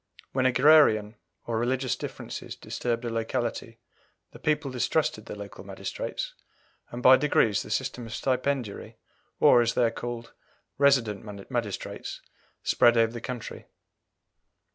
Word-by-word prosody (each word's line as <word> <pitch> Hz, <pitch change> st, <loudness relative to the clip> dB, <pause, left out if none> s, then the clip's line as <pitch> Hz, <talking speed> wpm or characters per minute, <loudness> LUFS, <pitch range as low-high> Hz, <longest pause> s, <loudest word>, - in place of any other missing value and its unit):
When 130 Hz, -1 st, +2 dB
agrarian 125 Hz, -5 st, +5 dB, 0.3 s
or 115 Hz, -1 st, -1 dB
religious 130 Hz, +1 st, 0 dB
differences -, -, -7 dB
disturbed 120 Hz, 0 st, -3 dB
a -, -, -1 dB
locality 115 Hz, 0 st, -3 dB, 0.5 s
the -, -, -13 dB
people 150 Hz, -2 st, 0 dB
distrusted 125 Hz, -3 st, 0 dB
the -, -, -6 dB
local 100 Hz, -1 st, -9 dB
magistrates, -, -, -5 dB, 0.6 s
and 120 Hz, +1 st, -7 dB
by 130 Hz, +1 st, +9 dB
degrees 115 Hz, -7 st, +2 dB
the -, -, -9 dB
system 120 Hz, -2 st, -2 dB
of 115 Hz, -, -6 dB
stipendiary, 130 Hz, -4 st, -2 dB, 0.4 s
or, 120 Hz, -, +7 dB
as 115 Hz, 0 st, 0 dB
they 125 Hz, -, +3 dB
are 115 Hz, -, +3 dB
called, 120 Hz, 0 st, -6 dB, 0.5 s
resident 110 Hz, -7 st, +1 dB
magistrates, 115 Hz, -6 st, -4 dB, 0.4 s
spread 120 Hz, 0 st, +4 dB
over 115 Hz, 0 st, +3 dB
the 120 Hz, -, -6 dB
country. 125 Hz, -2 st, -7 dB
120 Hz, 130 wpm, -27 LUFS, 115-130 Hz, 0.6 s, by